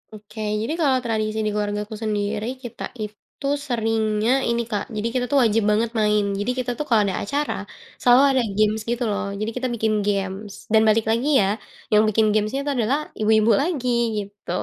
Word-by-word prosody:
Oke 215 +1 -12 0.2
jadi 255 +8 -2
kalau 270 -4 +3
tradisi 220 -1 -1
dikeluargaku 210 0 -2
sendiri 210 0 -1 0.2
kita 240 - -7 0.2
itu 210 +6 -10 0.2
seringnya 225 -1 0 0.2
ini 235 0 +1
Kak 205 - -1
jadi 215 +2 -1
kita 250 -1 0
tuh 285 - +3
wajib 225 -1 +2
banget 220 +2 +2
main 210 -1 +3 0.2
jadi 225 +5 0
kita 250 -1 -1
tuh 300 - -3
kalau 225 -3 +5
ada 190 -2 -1
acara, 285 +7 -1 0.5
selalu 245 +2 +6
ada 260 -2 +2 0.2
games 215 0 +2
gitu 240 +1 -1
loh 205 - -2
jadi 215 +2 -2
kita 255 0 -1
bikin 220 -1 0
games 200 0 -2 0.2
dan 220 - +6
balik 215 +1 +3
lagi 235 +6 0
ya, - - +3 0.5
yang 210 0 +5
bikin 220 +1 +3
gamesnya 215 +5 0
itu 290 - -1
adalah 240 +5 +2 0.2
ibu-ibu 220 +1 +4
lagi 285 -5 -1 0.3
gitu, 200 -3 -6
220 Hz, 180 wpm, -23 LUFS, 210-240 Hz, 0.5 s, selalu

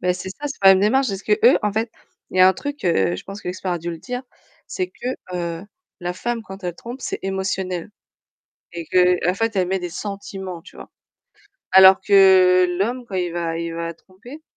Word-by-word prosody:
Beh, 180 0 +1
c'est 180 +1 -7
ça, 290 +9 -6
c'est 285 - -6
pas 195 - +7
la 195 - +9
même 190 - +1
démarche, 260 +6 +2
parce 195 -1 -4
que - - -1
eux, 480 - +7
en 210 - 0
fait, 225 +2 -2 0.4
il - - -7
y - - +6
a 185 - +8
un 190 - +4
truc, 285 +5 -7
heu, 95 - +2
je - - -8
pense 195 +2 -9
que - - -7
l'expert 185 0 -3
a 175 - -2
dû 170 +1 -5
le 165 - -7
dire, 250 +7 -5 0.4
c'est 185 -1 -3
que, 185 - -10 0.3
heu, 170 0 -4 0.4
la 175 0 -3
femme 235 +4 -4
quand 195 -2 -11
elle 175 -1 -3
trompe, 240 +7 -9
c'est - - -4
émotionnel 190 -1 -3 0.8
et 170 -1 -6
que, 180 -1 +2
en - - +1
fait, 225 +2 -2
elle 185 -2 +1
met 190 +1 -1
des 175 -1 -5
sentiments, 190 -2 -7
tu 180 - -17
vois? - - -12 0.8
Alors 190 0 +8
que 185 -2 +5
l'homme 245 +5 -1
quand 195 - -9
il 180 -2 -1
va 170 -1 -3
il 170 0 -4
va 170 0 -4
tromper, 220 - -14
190 Hz, 230 wpm, -21 LUFS, 180-205 Hz, 0.8 s, la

